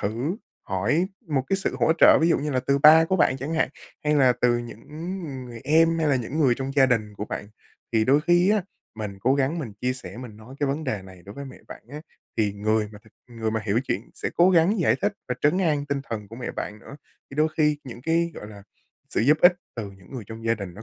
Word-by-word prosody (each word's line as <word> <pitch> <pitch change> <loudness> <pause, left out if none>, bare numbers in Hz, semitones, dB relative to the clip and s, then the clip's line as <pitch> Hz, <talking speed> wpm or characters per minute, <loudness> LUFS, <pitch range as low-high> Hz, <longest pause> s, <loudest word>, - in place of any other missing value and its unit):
thử 120 - -2 0.3
hỏi 115 - 0 0.2
một 145 -5 0
cái 195 - +2
sự 195 - -2
hỗ 160 - +4
trợ - - +7
ví 165 - +3
dụ 170 - +3
như 150 +1 -2
là 130 -2 0
từ 140 0 +3
ba 155 +3 +8
của 185 +3 0
bạn 135 -6 +3
chẳng 140 +5 -4
hạn, 160 - +2 0.4
hay 150 0 +2
là 130 -4 +5
từ 120 -1 +3
những, 115 -2 -8
ứ, 150 - -11 0.3
ừ, 135 - -6
người 120 -2 -9
em 165 +3 +4
hay 160 - +1
là 140 - +3
những 130 +5 -4
người 130 -5 +4
trong 135 +2 -4
gia 135 -2 +6
đình 110 -4 0
của 105 - -5
bạn. 105 - -6 0.5
Thì 110 -1 +3
đôi 140 +5 +4
khi 175 +4 +3
á, 210 -3 +2 0.3
mình 105 -3 -6
cố 130 +6 +3
gắng 140 +4 0
mình 120 -9 -5
chia 125 +1 0
sẻ, 100 -7 -9
mình 120 -4 -9
nói 110 +4 -13
cái 145 - +2
vấn 145 +3 -2
đề 110 -7 -2
này 95 -2 -14
đối 100 - -10
với 140 - -7
mẹ 135 - -10
bạn - - -10
á, 150 +1 -7 0.4
thì 105 -3 +1
người 105 +1 0
mà 105 - -11
thực 110 - -21 0.2
người 110 -1 -2
mà 110 0 -1
hiểu 110 +4 +2
chuyện 100 +1 -3
sẽ - - -4
cố 175 +2 +6
gắng 180 +4 +3
giải - - +3
thích 205 - +2 0.2
và 125 - 0
trấn 150 +6 +3
an 150 -6 +1
tinh 140 -1 -1
thần 105 -3 -4
của 115 - -10
mẹ 125 - -4
bạn 105 - -6
nữa. 140 - -12 0.3
Thì 135 - -10
đôi 155 +1 +3
khi 150 -2 +2
những 120 -1 -9
cái, 165 +3 +1
gọi 105 - -8
là, 100 -2 -12 0.5
sự - - 0
giúp 145 +6 +4
ích 175 - +8 0.2
từ 105 -4 -5
những 95 +1 -18
người 120 -6 -6
trong 115 +1 -9
gia 115 - +3
đình 100 -5 -8
nó 110 - -10
130 Hz, 270 wpm, -25 LUFS, 110-155 Hz, 0.5 s, ba